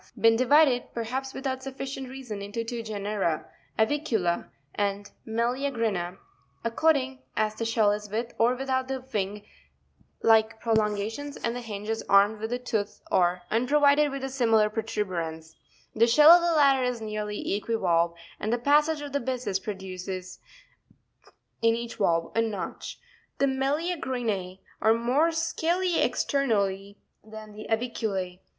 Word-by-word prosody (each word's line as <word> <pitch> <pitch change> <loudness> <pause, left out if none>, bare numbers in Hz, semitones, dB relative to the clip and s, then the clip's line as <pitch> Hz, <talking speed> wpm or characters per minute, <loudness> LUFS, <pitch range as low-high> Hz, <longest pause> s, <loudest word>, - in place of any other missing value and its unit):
been 225 0 +5
divided, 255 +1 +4
perhaps 255 +4 -3
without 265 -1 -4
sufficient 270 0 -6
reason, 250 -6 -7
into 205 +3 -4
two 235 0 -4
genera, 205 -6 -2 0.3
Avicuta 220 - 0 0.3
and 200 0 -2 0.2
Meneacrina, 230 -6 -1 0.5
according 265 +2 +1 0.2
as 215 0 +1
the 230 - -4
shell 225 -2 +3
is 210 0 -4
with 230 +3 -3
or 240 +2 +4
without 260 0 -1
the 265 -1 -3
wing 205 0 -2 0.8
like 220 0 +4
prolon 220 -2 +1
gations, 255 +8 -5
and 230 +1 -1
the 245 - -4
hinge 210 -3 -7
is 225 0 -2
armed 200 +2 +5
with 220 +2 -4
a 245 - 0
tooth 220 -5 -3
or 180 0 +2
unprovided 285 +5 +4
with 275 -1 -5
a 270 - -2
similar 225 -5 +3
protuberance: 175 -8 -3 0.4
the 230 +1 +4
shell 300 +7 +8
of 350 0 +8
the 340 -1 +1
latter 275 -3 +5
is 250 -1 -1
nearly 215 -2 -3
equivalve, 170 -7 +1 0.2
and 215 - -2
the 240 - +2
passage 295 +4 +3
of 290 -1 -7
the 285 - +1
byssus 240 -6 -2
produces 185 -2 -6 1.2
in 230 0 +4
each 235 0 -6
valve 165 -5 +1
a 225 - +4
notch. 220 -3 -4 0.4
The 275 - +3
Meleagrine 265 - -2 0.2
are 220 +1 +5
more 260 +8 +2
scaly 335 +2 0
ex - - +1
ternally 200 -7 0 0.3
than 215 0 -10
the 215 - -9
Avicule. 215 -6 -2
225 Hz, 145 wpm, -27 LUFS, 205-265 Hz, 1.2 s, shell